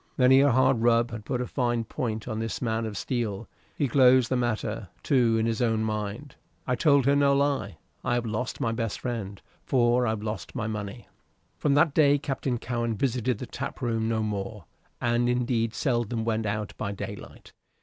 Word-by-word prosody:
Many 130 +1 +6
a 145 - +5
hard 130 0 +3
rub 115 0 +3
had 110 -2 -7
put 125 -2 -2
a - - -1
fine 120 -3 0
point 110 -2 -4
on 110 - -3
this 115 0 -3
man 115 -2 -1
of 105 - -6
steel. 115 -4 -3 0.3
He 145 - 0
glozed 130 -1 +5
the 130 - +1
matter, 115 -5 -2
too, 120 -5 +3
in 110 - +1
his 115 0 -1
own 115 -2 +1
mind. 110 +5 -4 0.3
"I 125 - 0
told 140 -1 +4
her 140 +1 +4
no 140 -1 +4
lie. 140 - 0 0.3
I 120 - +1
have 120 -1 -1
lost 115 +3 -3
my 115 - 0
best 115 -2 -3
friend, 110 -6 -4 0.2
for 120 -1 +2
I've 110 -1 -2
lost 105 -4 -5
my 115 -4 -2
money." 105 +1 -5 0.5
From 140 -2 +2
that 145 0 +4
day 145 -2 +5
Captain 135 -3 -2
Cowen 120 -1 -2
visited 125 -1 0
the 125 - -6
tap 135 +2 -6
room 115 -3 -1
no 110 -1 0
more, 100 -2 -4 0.3
and 120 0 +1
indeed 120 -2 0
seldom 120 -4 -1
went 110 -1 0
out 105 0 -3
by 100 - -2
daylight. 100 - -8
120 Hz, 190 wpm, -27 LUFS, 110-130 Hz, 0.5 s, Many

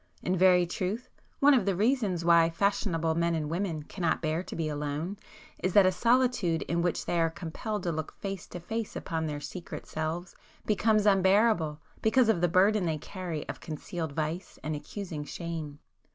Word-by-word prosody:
In 185 - +1
very 180 -1 +5
truth, 200 +8 -3 0.3
one 285 +1 +7
of 255 - +4
the 195 - +2
reasons 205 -5 +1
why 170 -1 +6
'fashionable' 165 -2 0
men 170 +1 +1
and 155 -1 -2
women 170 -3 -2
cannot 170 +1 -1
bear 160 +1 -1
to - - -8
be 165 -2 -1
alone 150 +5 -3 0.4
is, 185 0 0
that 200 -2 +7
a 185 - +5
solitude 235 -6 +2
in 170 +1 -1
which 175 0 -1
they 170 - +1
are 165 - +3
compelled 180 +5 -5
to 175 - 0
look 160 -1 -4
face 195 -2 -6
to 180 - -7
face 220 +5 -4
upon 160 -2 -2
their 150 -1 -3
secret 170 +5 -7
selves 160 +3 -4 0.3
becomes 215 0 +2
unbearable 190 -5 +3 0.2
because 225 +1 +4
of 180 -6 +2
the 175 - +4
burden 185 +2 +3
they 160 -1 0
carry 175 -1 -5
of - - -6
concealed 160 0 -5
vice 160 +4 -3
and 155 +1 -2
accusing 165 0 -6
shame. 160 -1 -5
175 Hz, 180 wpm, -29 LUFS, 160-200 Hz, 0.4 s, one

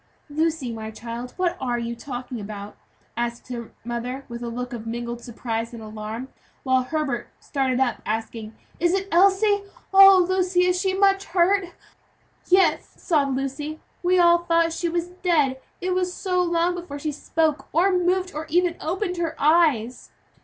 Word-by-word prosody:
"Lucy, 310 -4 0
my 220 -1 -6
child, 235 +3 -7
what 365 -2 +1
are 245 -2 0
you 235 0 -3
talking 245 -1 -6
about?" 205 0 -7 0.4
asked 235 +1 -3
her 235 -2 -6
mother 245 +3 -4
with 235 0 -7
a 240 - -4
look 245 +1 -5
of 230 -1 -6
mingled 235 +1 -4
surprise 230 0 -4
and 225 - -9
alarm, 215 +3 -6 0.4
while 260 -1 +3
Herbert 270 -2 -2
started 265 -3 -1
up 255 -3 0
asking, 220 0 -4 0.2
"Is 345 +2 +3
it 390 0 -2
Elsie? 395 +3 +4 0.3
Oh! 390 -2 +9
Lucy, 365 -1 +2
is 360 0 +1
she 380 -1 0
much 390 0 +3
hurt?" 370 +2 +2 0.8
"Yes," 375 +1 +3
sobbed 280 -6 +1
Lucy, 290 +3 -4 0.2
"we 365 +1 +3
all 345 -1 +6
thought 335 -1 +2
she 345 0 -1
was 345 +1 -2
dead, 290 -7 +2 0.2
it 365 0 0
was 365 0 0
so 365 -1 0
long 345 0 +1
before 345 -5 -6
she 300 +1 -3
spoke, 310 +1 -1
or 360 +5 +3
moved, 365 +1 +1
or 305 +2 -5
even 350 +1 +2
opened 360 +3 -2
her 330 -2 -2
eyes." 290 -7 +2
305 Hz, 165 wpm, -24 LUFS, 240-360 Hz, 0.8 s, Oh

